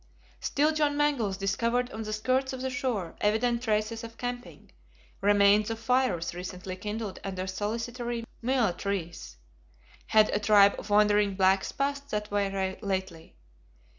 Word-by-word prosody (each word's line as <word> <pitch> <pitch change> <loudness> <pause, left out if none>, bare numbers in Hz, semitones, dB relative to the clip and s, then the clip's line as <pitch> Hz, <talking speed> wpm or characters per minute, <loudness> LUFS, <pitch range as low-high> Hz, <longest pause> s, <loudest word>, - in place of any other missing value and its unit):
Still 300 +2 +1
John 295 -2 +1
Mangles 260 -10 +1
discovered 230 +5 0
on 220 - -6
the 215 -1 -5
skirts 255 +5 0
of 260 - -6
the 260 0 -2
shore 250 -9 -2
evident 230 +3 +1
traces 220 -1 -1
of 230 0 -9
camping, 245 0 -6 0.5
remains 205 +1 +4
of 225 - -3
fires 225 -8 0
recently 180 +1 -6
kindled 210 +1 -5
under 185 -1 -4
solitary 230 +4 -3 0.2
Myall 240 -6 +1
trees. 180 - -4 0.7
Had 215 -1 +4
a 205 - +1
tribe 205 -1 +6
of 205 - -9
wandering 205 -1 +3
blacks 190 0 +2
passed 280 0 -2
that 210 -2 -3
way 195 -2 -1
lately? 190 -5 -4
215 Hz, 140 wpm, -28 LUFS, 195-245 Hz, 0.7 s, tribe